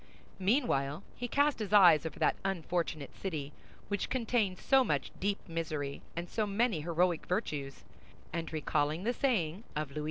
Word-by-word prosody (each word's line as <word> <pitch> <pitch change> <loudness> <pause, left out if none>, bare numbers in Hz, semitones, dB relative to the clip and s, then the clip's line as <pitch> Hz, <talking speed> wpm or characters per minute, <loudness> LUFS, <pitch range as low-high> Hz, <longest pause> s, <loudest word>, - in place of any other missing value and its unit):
Meanwhile, 190 - +1
he 245 - -4
cast 285 +3 +2
his 210 -2 -3
eyes 170 -6 +7
over - - -8
that - - +2
unfortunate 170 -5 -2
city, 150 -7 -4 0.3
which 205 -1 -2
contained 225 -6 +1
so 270 +6 +4
much 145 - -1
deep 200 +1 0
misery 155 -4 -3
and 170 +1 -3
so 215 +3 -1
many 205 -4 +1
heroic 170 +1 +1
virtues, 150 -8 -2 0.5
and 165 -1 -3
recalling 155 +1 0
the 240 +3 +1
saying 205 - 0
of 150 -2 -2
Louis 145 - -8
XI. - - 0
175 Hz, 160 wpm, -32 LUFS, 155-210 Hz, 0.5 s, eyes